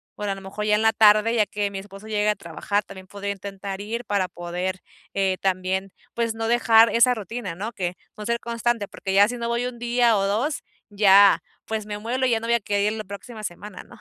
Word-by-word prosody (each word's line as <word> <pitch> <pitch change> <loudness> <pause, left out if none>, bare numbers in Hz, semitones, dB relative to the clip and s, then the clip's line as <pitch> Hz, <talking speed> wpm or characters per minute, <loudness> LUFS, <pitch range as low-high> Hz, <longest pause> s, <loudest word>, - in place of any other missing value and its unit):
bueno, 205 -1 -3
a - - -2
lo 195 - -10
mejor 195 +2 -5
ya 210 - +2
en 210 - +1
la 225 0 +4
tarde, 215 +1 +5
ya 215 -2 +3
que 205 -1 -2
mi 195 - -5
esposo 195 +2 -12
llegue 210 -1 0
a - - +4
trabajar 200 +5 -2
también 190 -1 -11
podría 200 +1 -4
intentar 195 0 -7
ir 230 +4 -4
para 200 -3 0
poder, 180 +2 -4 0.3
eh, 190 -1 +1
también, 190 0 -1 0.2
pues 230 -1 0
no 225 0 -2
dejar 230 -1 +5
esa 235 +4 +4
rutina, 220 -3 -5
¿no? 210 +6 -4
Que 180 -4 -3 0.2
con 210 - -8
ser 235 +1 0
constante, 235 -2 -1
porque 190 - -5
ya 200 +1 +6
si 245 +2 -4
no 235 0 -3
voy 235 +1 -1
un 250 -1 -7
día 240 -1 +3
o 195 - +1
dos, 250 +8 -1 0.3
ya, 200 -1 +6 0.2
pues 220 -1 -3
me 210 -1 -5
muelo 245 +4 -1
y 255 - +2
ya 225 - +2
no 230 - -6
voy 235 - +3
a - - +2
querer 205 +1 0
ir - - -6
la 215 - -4
próxima 215 +3 -9
semana, 205 +1 -7
¿no? - - -16
210 Hz, 245 wpm, -24 LUFS, 195-230 Hz, 0.3 s, ya